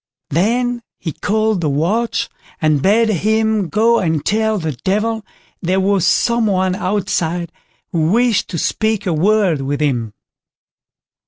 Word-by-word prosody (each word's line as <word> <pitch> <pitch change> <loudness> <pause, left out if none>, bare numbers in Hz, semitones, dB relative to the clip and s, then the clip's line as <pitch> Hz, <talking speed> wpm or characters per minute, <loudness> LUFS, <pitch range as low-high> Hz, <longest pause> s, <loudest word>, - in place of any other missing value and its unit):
Then 240 - +1 0.2
he 160 - -4
called 215 +2 0
the 155 - 0
watch, 190 +12 0 0.3
and 155 -3 +2
bade 220 +6 +3
him 215 0 +1
go 230 +2 +3
and 160 -5 -1
tell 220 +1 +1
the 160 -4 -2
Devil 210 - -1 0.4
there 185 +1 +1
was 190 -2 +2
some 235 +3 +2
one 185 -2 +1
outside 180 -3 -1 0.4
who 160 -2 +1
wished 235 -1 +2
to 170 - -5
speak 220 +5 -1
a 180 - 0
word 185 -2 +2
with 140 +1 -2
him. 120 -8 -1
195 Hz, 140 wpm, -17 LUFS, 165-220 Hz, 0.4 s, bade